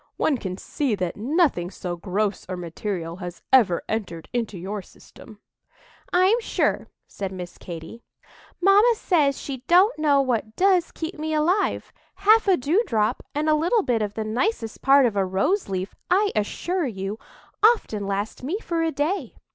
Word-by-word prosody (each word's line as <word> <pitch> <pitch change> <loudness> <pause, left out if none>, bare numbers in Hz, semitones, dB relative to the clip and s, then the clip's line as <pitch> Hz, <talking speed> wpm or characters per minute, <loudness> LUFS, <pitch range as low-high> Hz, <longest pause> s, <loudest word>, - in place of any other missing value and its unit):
"One 280 -5 +1
can 185 -3 -5
see 265 +2 -2
that 180 -3 -3
nothing 255 - +1
so 180 -2 -5
gross 195 +3 -2
or 185 - -3
material 170 0 -5
has 180 -2 -8
ever 215 -10 +5
entered 190 -7 -4
into 230 -5 -2
your 195 +4 -5
system." 210 +3 -16 0.7
"I'm 375 +6 +4
sure," - - 0 0.2
said 195 -2 -5
Miss 180 -2 -8
Katy, 170 +6 -9 0.6
"mamma 405 +6 +5
says 300 -10 +1
she 275 -2 -5
don't 370 +4 +5
know 290 -2 +4
what 230 -5 -1
does 370 -3 +3
keep 320 0 -6
me 310 0 -2
alive; 345 +7 0 0.2
half 420 +3 +4
a 380 -2 +5
dewdrop 255 - +1
and 300 +1 0
a 310 - +4
little 350 +9 +2
bit 240 -6 0
of 210 -1 -3
the 220 - -2
nicest 230 - -2
part 275 0 +6
of 225 -4 0
a 195 - +2
rose 195 - 0
leaf, 190 0 -3 0.2
I 395 +3 +3
assure 335 - -1
you, 200 -1 -5 0.4
often 325 - +3
last 200 +2 -3
me 300 +10 -2
for 340 -7 -2
a 325 0 +1
day. 310 +8 -2
245 Hz, 165 wpm, -24 LUFS, -, 0.7 s, part